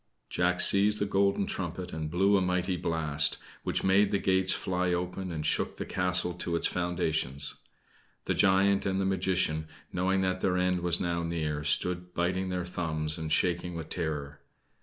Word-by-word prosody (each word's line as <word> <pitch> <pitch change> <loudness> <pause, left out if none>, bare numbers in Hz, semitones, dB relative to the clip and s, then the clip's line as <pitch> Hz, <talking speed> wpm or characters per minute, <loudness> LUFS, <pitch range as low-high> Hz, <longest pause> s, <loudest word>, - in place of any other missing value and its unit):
Jack 90 0 +1
seized 105 +2 +4
the 105 - 0
golden 100 0 +1
trumpet 90 0 -5
and 80 -1 -4
blew 95 +5 +3
a 95 - +3
mighty 90 0 0
blast, 80 -4 +2 0.2
which - - -1
made 95 +2 +4
the 100 - +1
gates 95 -1 +2
fly 90 -1 -1
open 90 +1 -3
and 75 -2 -4
shook - - +1
the - - -5
castle 90 -1 0
to 85 0 -3
its 85 - +2
foundations. 80 -6 -1 0.7
The - - 0
giant 95 +1 +3
and 95 0 0
the 95 - 0
magician, 90 -5 0 0.3
knowing 95 +2 +1
that 95 0 -1
their 90 -1 +1
end 90 0 +1
was 85 0 +1
now 85 -2 -1
near, 80 -3 -2
stood 90 +5 0
biting 90 +2 -1
their 90 -1 -2
thumbs 80 -2 -3
and 80 -1 -5
shaking 90 +1 0
with 80 -2 -6
terror. 75 -4 -4
90 Hz, 175 wpm, -29 LUFS, 80-95 Hz, 0.7 s, seized